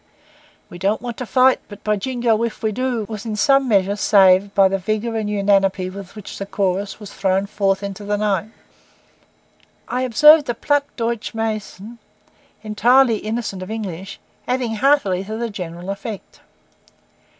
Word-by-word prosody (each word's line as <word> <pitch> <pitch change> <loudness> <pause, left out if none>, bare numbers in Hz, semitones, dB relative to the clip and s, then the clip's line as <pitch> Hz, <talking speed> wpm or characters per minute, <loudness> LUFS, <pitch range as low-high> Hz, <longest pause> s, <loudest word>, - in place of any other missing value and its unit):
'We 175 - -9
don't 200 +4 0
want 240 -1 -5
to 250 - -5
fight, 260 +1 +4
but, 205 -1 -12
by 210 0 +1
Jingo, 235 0 0
if 230 -1 -4
we 220 - +1
do,' 245 -1 -2
was 215 -2 -6
in 220 -2 -4
some 275 +5 +3
measure 200 -3 +2
saved 195 -1 +4
by 195 -1 +6
the 195 +1 -1
vigour 215 +4 -2
and 215 -2 -2
unanimity 195 -2 +1
with 200 0 -10
which 210 -3 -9
the 195 - -5
chorus 195 +1 -2
was 210 -2 -10
thrown 190 0 0
forth 195 -1 -1
into 200 +1 -6
the 205 0 -1
night. 205 -1 -1 1.4
I 250 - -2
observed 295 +4 +6
a 240 - 0
Platt 290 +4 +1
Deutsch 230 -2 -3
mason, 220 0 -5 0.6
entirely 230 +3 +3
innocent 215 -3 -4
of 185 - -7
English, 195 -3 -6 0.3
adding 250 -2 -1
heartily 210 -8 +2
to 215 +2 -5
the 235 -1 -3
general 180 -1 -6
effect. 200 +1 -8
210 Hz, 160 wpm, -20 LUFS, 195-235 Hz, 1.4 s, by